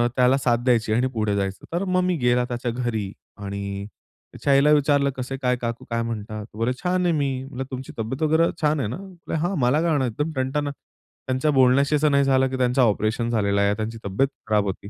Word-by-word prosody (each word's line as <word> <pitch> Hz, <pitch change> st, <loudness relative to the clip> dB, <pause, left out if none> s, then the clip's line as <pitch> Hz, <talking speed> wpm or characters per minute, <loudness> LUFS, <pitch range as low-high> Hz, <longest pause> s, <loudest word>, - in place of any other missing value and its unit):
त्याला 130 Hz, +1 st, +4 dB
साथ 120 Hz, -3 st, +2 dB
द्यायची 115 Hz, -4 st, +2 dB
आणि 125 Hz, +3 st, +2 dB
पुढे 105 Hz, -3 st, 0 dB
जायचं. 95 Hz, -1 st, -3 dB
तर 175 Hz, +3 st, 0 dB
मग 185 Hz, 0 st, +2 dB
मी 180 Hz, 0 st, +1 dB
गेला 125 Hz, -2 st, +2 dB
त्याच्या 120 Hz, -1 st, -3 dB
घरी 115 Hz, -5 st, -2 dB, 0.3 s
आणि 100 Hz, 0 st, -5 dB, 0.5 s
त्याच्या 140 Hz, -, +1 dB
आईला 140 Hz, +2 st, +5 dB
विचारलं, 145 Hz, -1 st, +3 dB
कसं 130 Hz, +1 st, -4 dB
काय 125 Hz, -1 st, +2 dB
काकू 115 Hz, -1 st, -4 dB
काय 115 Hz, 0 st, -1 dB
म्हणतात? 110 Hz, -2 st, -5 dB
बोले 115 Hz, +3 st, 0 dB
"छान 180 Hz, 0 st, +1 dB
आहे 175 Hz, -, +3 dB
मी." 145 Hz, -2 st, +1 dB, 0.2 s
म्हणलं 135 Hz, -1 st, -6 dB
तुमची 130 Hz, 0 st, -6 dB
तब्येत 115 Hz, +6 st, -3 dB
वगैरे 160 Hz, +2 st, +3 dB
छान 150 Hz, 0 st, +2 dB
आहे 115 Hz, -7 st, -1 dB
ना? 120 Hz, -, -4 dB, 0.4 s
हा 175 Hz, +5 st, -1 dB
मला 130 Hz, +5 st, +3 dB
काय 170 Hz, -, +1 dB
होणार 140 Hz, -4 st, +2 dB
आहे -, -, -3 dB
एकदम 150 Hz, +8 st, -2 dB
टणटण. 135 Hz, +3 st, -1 dB
त्यांच्या 135 Hz, 0 st, -4 dB
बोलण्याशी 135 Hz, +2 st, +4 dB
असं 150 Hz, 0 st, +2 dB
नाही 140 Hz, 0 st, +4 dB
झालं, 135 Hz, -1 st, +3 dB
की 130 Hz, -, -3 dB
त्यांचं 125 Hz, +1 st, +2 dB
ऑपरेशन 110 Hz, +1 st, +1 dB
झालेलं 100 Hz, -3 st, +1 dB
आहे, 100 Hz, 0 st, +3 dB
त्यांची 110 Hz, +1 st, -4 dB
तब्येत 100 Hz, +8 st, +1 dB, 0.2 s
खराब 105 Hz, -1 st, +2 dB
होती. 100 Hz, +1 st, -5 dB
125 Hz, 215 wpm, -23 LUFS, 110-140 Hz, 0.5 s, आईला